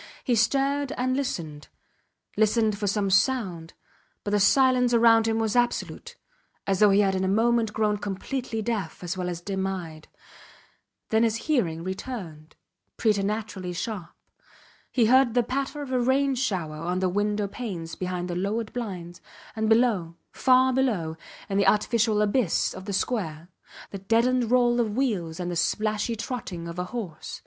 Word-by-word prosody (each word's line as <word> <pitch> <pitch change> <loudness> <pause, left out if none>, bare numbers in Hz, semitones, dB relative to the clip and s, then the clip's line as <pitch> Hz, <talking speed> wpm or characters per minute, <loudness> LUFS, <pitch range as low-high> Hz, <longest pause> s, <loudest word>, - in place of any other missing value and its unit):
He 250 - +1
stared 275 +5 +1
and 255 +1 0
listened; 160 - -4 0.7
listened 215 0 +2
for 205 0 -3
some 200 -1 0
sound, 190 -6 +1 0.5
but 205 - -3
the 205 - +3
silence 250 +3 +4
round 225 -1 +5
him 225 0 +1
was 220 -1 0
absolute 240 0 -1 0.5
as 195 -1 0
though 210 - +6
he 200 +1 +5
had 195 -1 +2
in 190 0 -1
a - - +1
moment 225 +2 +2
grown 210 -1 +1
completely 220 +4 -4
deaf 220 -5 -3
as 175 +1 -3
well 180 -1 -3
as 175 -1 -5
dim 190 +1 -2
eyed. 165 -5 -6 1.0
Then 220 0 +3
his 225 -1 +2
hearing 175 - 0
returned, 185 -6 -7 0.4
preternaturally 205 -3 -1
sharp. 185 -1 -4 0.8
He 240 -4 +3
heard 255 0 +4
the 245 - +4
patter 275 +4 -3
of 270 - -8
a 255 - +1
rain 270 +3 +2
shower 185 -12 -2
on 175 +3 -2
the 185 0 +1
window 205 +2 0
panes 190 -7 -6
behind 180 -1 -3
the 175 - -4
lowered 210 +5 -2
blinds, 180 -8 -6 0.3
and 220 0 0
below, 220 -8 +2 0.2
far 260 0 +4
below, 210 -12 0 0.3
in 200 -1 0
the 200 - +3
artificial 215 0 +2
abyss 210 -3 +1
of 190 - -9
the 205 - -4
square, 175 -7 -2 0.4
the 195 - -6
deadened 230 +4 +2
roll 245 -1 +3
of 220 -2 -1
wheels 185 -12 -1
and 180 0 -3
the - - -3
splashy 215 +6 0
trotting 210 -7 -5
of 170 +1 -6
a 180 - -2
horse. 180 -7 -6
210 Hz, 165 wpm, -26 LUFS, 185-240 Hz, 1.0 s, though